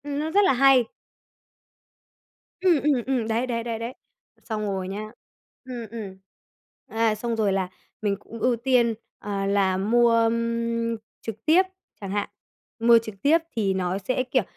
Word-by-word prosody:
Ừm, 285 Hz, 0 st, -3 dB
nó 310 Hz, +1 st, -1 dB
rất 405 Hz, +5 st, +4 dB
là 380 Hz, -, +4 dB
hay. 265 Hz, -1 st, +5 dB, 1.7 s
Ừm, 350 Hz, -6 st, +3 dB
ừm, 280 Hz, -5 st, +2 dB
ừm, 255 Hz, -4 st, 0 dB
đấy, 230 Hz, +3 st, 0 dB
đấy, 230 Hz, -2 st, -2 dB
đấy, 230 Hz, -1 st, -3 dB
đấ, 230 Hz, +1 st, -4 dB, 0.5 s
xong 220 Hz, -2 st, -3 dB
rồi 195 Hz, -3 st, -2 dB
nhá, 210 Hz, +3 st, -5 dB, 0.5 s
ừm, 245 Hz, -3 st, -6 dB
ừm. 205 Hz, -5 st, -7 dB, 0.7 s
À, 225 Hz, -1 st, +1 dB
xong 230 Hz, +2 st, -2 dB
rồi 210 Hz, -3 st, +1 dB
là 190 Hz, -1 st, -1 dB, 0.3 s
mình 205 Hz, -2 st, +1 dB
cũng 230 Hz, +2 st, -11 dB
ưu 250 Hz, +1 st, +2 dB
tiên, 240 Hz, -1 st, +2 dB, 0.3 s
à, 200 Hz, -1 st, -3 dB
là 195 Hz, -2 st, +2 dB
mua, 235 Hz, +5 st, +3 dB
ưm, 230 Hz, 0 st, 0 dB, 0.2 s
trực 220 Hz, -1 st, -7 dB
tiếp, 330 Hz, +5 st, +6 dB, 0.4 s
chẳng 195 Hz, -1 st, -5 dB
hạn, 205 Hz, 0 st, -1 dB, 0.5 s
mua 235 Hz, +1 st, +7 dB
trực 220 Hz, -2 st, -8 dB
tiếp 300 Hz, +7 st, +5 dB, 0.2 s
thì 200 Hz, -4 st, +1 dB
nó 185 Hz, 0 st, -1 dB
sẽ, 255 Hz, +6 st, -1 dB
kiểu, 255 Hz, -2 st, +1 dB
230 Hz, 165 wpm, -25 LUFS, 205-250 Hz, 1.7 s, mua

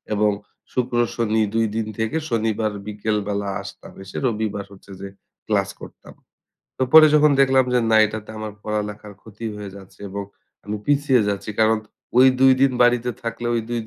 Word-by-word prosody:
এবং 105 Hz, 0 st, +2 dB, 0.4 s
শুক্র 125 Hz, -1 st, -1 dB, 0.2 s
শনি 110 Hz, -1 st, +1 dB
২ 115 Hz, 0 st, +2 dB
দিন 110 Hz, -1 st, -2 dB
থেকে 110 Hz, +8 st, -1 dB
শনিবার 110 Hz, -2 st, 0 dB, 0.2 s
বিকেল 105 Hz, +1 st, -2 dB
বেলা 100 Hz, -1 st, -2 dB
আসতাম, -, -, -11 dB
এসে 95 Hz, -, -9 dB
রবিবার 105 Hz, -3 st, -2 dB
হচ্ছে 100 Hz, 0 st, -15 dB
যে 100 Hz, -, -5 dB, 0.4 s
ক্লাস -, -, +1 dB
করতাম। -, -, -13 dB, 0.7 s
তো -, -, 0 dB
পরে 155 Hz, -1 st, +10 dB
যখন 150 Hz, 0 st, +5 dB
দেখলাম 130 Hz, -1 st, +4 dB
যে 125 Hz, -, +4 dB
না 110 Hz, -, +5 dB
এটাতে 110 Hz, 0 st, -7 dB
আমার 110 Hz, -1 st, -5 dB
পড়ালেখার 105 Hz, -1 st, -4 dB
ক্ষতি 110 Hz, +1 st, -11 dB
হয়ে 100 Hz, -2 st, -7 dB
যাচ্ছে 95 Hz, 0 st, -15 dB
এবং 100 Hz, +1 st, -4 dB, 0.4 s
আমি 105 Hz, +1 st, -4 dB
পিছিয়ে 145 Hz, -3 st, +3 dB
যাচ্ছি। 100 Hz, +1 st, -3 dB
কারণ 110 Hz, 0 st, +4 dB, 0.4 s
ওই 130 Hz, -, +8 dB
২ 135 Hz, 0 st, +7 dB
দিন 135 Hz, -1 st, +5 dB
বাড়িতে 120 Hz, 0 st, +2 dB
থাকলে 120 Hz, +1 st, -4 dB
ঐ -, -, 0 dB, 0.2 s
২ 120 Hz, -1 st, -1 dB
110 Hz, 175 wpm, -22 LUFS, 105-120 Hz, 0.7 s, পরে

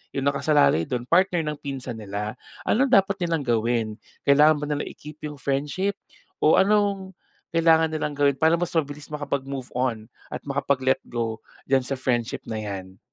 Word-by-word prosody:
'yong 135 Hz, -1 st, -1 dB
nakasalalay 140 Hz, -, +3 dB
do'n 120 Hz, -1 st, -2 dB
partner 175 Hz, +3 st, +3 dB
ng 150 Hz, -1 st, -3 dB
pinsan 130 Hz, -5 st, -5 dB
nila. 105 Hz, +1 st, -4 dB, 0.3 s
Ano 265 Hz, +5 st, +3 dB
dapat 195 Hz, -4 st, +4 dB
nilang 165 Hz, -4 st, 0 dB
gawin? 115 Hz, -1 st, +1 dB, 0.4 s
Kailangan 150 Hz, +2 st, +6 dB
ba 150 Hz, -, -3 dB
na 145 Hz, -, -2 dB
i-keep 150 Hz, +1 st, -12 dB
'yong 150 Hz, -1 st, -6 dB
friendship 145 Hz, +9 st, -1 dB, 0.5 s
o 155 Hz, -, +6 dB
anong 200 Hz, -1 st, +2 dB, 0.4 s
kailangan 160 Hz, -1 st, +4 dB
nilang 150 Hz, -1 st, -2 dB
gawin 140 Hz, -1 st, +3 dB
para 160 Hz, +1 st, +5 dB
mas 175 Hz, 0 st, -2 dB
mabilis 145 Hz, -2 st, -2 dB
makapag-move 140 Hz, -3 st, -3 dB
on 120 Hz, -3 st, -1 dB, 0.2 s
at -, -, -4 dB
makapag-let 135 Hz, -1 st, +1 dB
go 115 Hz, -2 st, -2 dB, 0.3 s
diyan 130 Hz, -1 st, +3 dB
sa 135 Hz, -, -2 dB
friendship 120 Hz, -3 st, -1 dB
na 110 Hz, -, -3 dB
'yan? 95 Hz, -3 st, -6 dB
140 Hz, 160 wpm, -25 LUFS, 125-160 Hz, 0.5 s, Kailangan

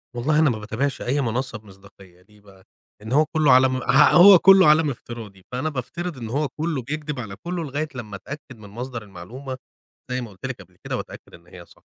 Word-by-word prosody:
والله 150 Hz, +6 st, +1 dB
أنا 155 Hz, -3 st, +4 dB
ما 110 Hz, -, -2 dB
باتابعش 115 Hz, +6 st, -3 dB
أي 140 Hz, +4 st, 0 dB
منصة 120 Hz, -1 st, -2 dB
بمصداقية 95 Hz, -3 st, -18 dB
ليه 105 Hz, +3 st, -23 dB
بقى؟ 95 Hz, -2 st, -19 dB, 0.4 s
لأن 110 Hz, +3 st, -8 dB
هو 150 Hz, +3 st, +4 dB
كلّه 155 Hz, -1 st, +2 dB
عالم 130 Hz, 0 st, +5 dB
ه 130 Hz, +3 st, +4 dB
هو 180 Hz, +1 st, +9 dB
كلّه 190 Hz, -1 st, +7 dB
عالم 155 Hz, 0 st, +4 dB
افتراضي، 115 Hz, -6 st, -9 dB
فأنا 130 Hz, +5 st, -2 dB
بافترض 155 Hz, +4 st, -5 dB
إن 115 Hz, -3 st, -7 dB
هو 145 Hz, +5 st, -1 dB
كلّه 155 Hz, +1 st, -3 dB
بيكدب 150 Hz, +2 st, -5 dB
على 100 Hz, -5 st, -7 dB
كلّه 175 Hz, -, -5 dB
لغاية 150 Hz, +1 st, -3 dB
لمّا 110 Hz, -5 st, -7 dB
أتأكد 130 Hz, +5 st, -10 dB
من 105 Hz, -2 st, -13 dB
مصدر 120 Hz, +2 st, -6 dB
المعلومة، 115 Hz, +8 st, -9 dB, 0.5 s
زي 125 Hz, -, -1 dB
ما 120 Hz, -, -7 dB
قُلت 95 Hz, +5 st, -11 dB
لِك 130 Hz, -6 st, -5 dB
قبل 90 Hz, 0 st, -19 dB
كده -, -, -3 dB
واتأكد -, -, -10 dB
إن 85 Hz, 0 st, -16 dB
هي 90 Hz, -1 st, -13 dB
صح، -, -, -23 dB
125 Hz, 210 wpm, -23 LUFS, 105-150 Hz, 0.5 s, هو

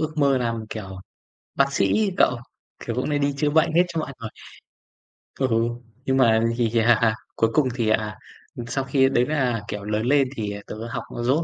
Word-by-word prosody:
ước 155 Hz, -1 st, -2 dB
mơ 140 Hz, -3 st, +3 dB
làm, 115 Hz, -2 st, -2 dB
kiểu, 95 Hz, -4 st, -7 dB, 0.6 s
bác 140 Hz, 0 st, +2 dB
sĩ 100 Hz, -6 st, +2 dB, 0.2 s
ấy 195 Hz, -3 st, -1 dB
cậu. 125 Hz, -, +4 dB, 0.5 s
Kiểu 115 Hz, -, -3 dB
cũng 130 Hz, +4 st, -1 dB
hay 145 Hz, -1 st, +1 dB
đi 140 Hz, 0 st, +1 dB
chữa 150 Hz, +1 st, +1 dB
bệnh 160 Hz, +2 st, +3 dB
hết 175 Hz, +2 st, +5 dB
cho 165 Hz, -2 st, -3 dB
mọi 155 Hz, -, -4 dB
người. 110 Hz, -2 st, -6 dB, 1.1 s
Ừ, 135 Hz, -, +2 dB, 0.6 s
nhưng 130 Hz, 0 st, +1 dB
mà 115 Hz, -4 st, +4 dB, 0.2 s
thì, 115 Hz, -3 st, +1 dB
à, 115 Hz, -1 st, +4 dB, 0.2 s
cuối 115 Hz, -, +2 dB
cùng 150 Hz, -4 st, +3 dB
thì, 115 Hz, -3 st, 0 dB
à, 110 Hz, -2 st, 0 dB, 0.5 s
sau 135 Hz, +3 st, -2 dB
khi 135 Hz, 0 st, +3 dB
đấy 125 Hz, -2 st, +2 dB
là, 130 Hz, -7 st, 0 dB
kiểu, 105 Hz, -2 st, -5 dB
lớn 105 Hz, +2 st, -1 dB
lên 140 Hz, +1 st, +3 dB
thì 105 Hz, -2 st, -3 dB
tớ -, -, -6 dB
học -, -, -4 dB, 0.2 s
dốt 135 Hz, +7 st, +2 dB
125 Hz, 200 wpm, -23 LUFS, 110-140 Hz, 1.1 s, hết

